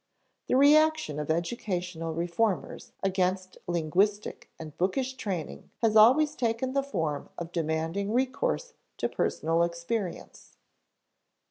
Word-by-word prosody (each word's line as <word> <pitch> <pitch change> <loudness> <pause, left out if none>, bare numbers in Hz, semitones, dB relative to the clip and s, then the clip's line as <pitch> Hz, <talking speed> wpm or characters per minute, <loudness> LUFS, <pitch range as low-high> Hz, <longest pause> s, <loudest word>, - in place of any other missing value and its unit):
The - - +2
reaction 300 - +4
of 150 - -4
educational 175 -1 -2
reformers 175 +4 -1
against 185 -1 -1
linguistic 180 +5 0
and 155 -2 -9
bookish 250 +9 0
training 190 - -5
has 220 -1 +3
always 280 +8 +6
taken 235 +2 -1
the 275 - +2
form 160 - -3
of 170 0 -6
demanding 165 +4 -1
recourse 265 - -1 0.2
to - - 0
personal 165 +1 0
experience. 170 +3 -4
190 Hz, 110 wpm, -28 LUFS, 170-250 Hz, 0.2 s, always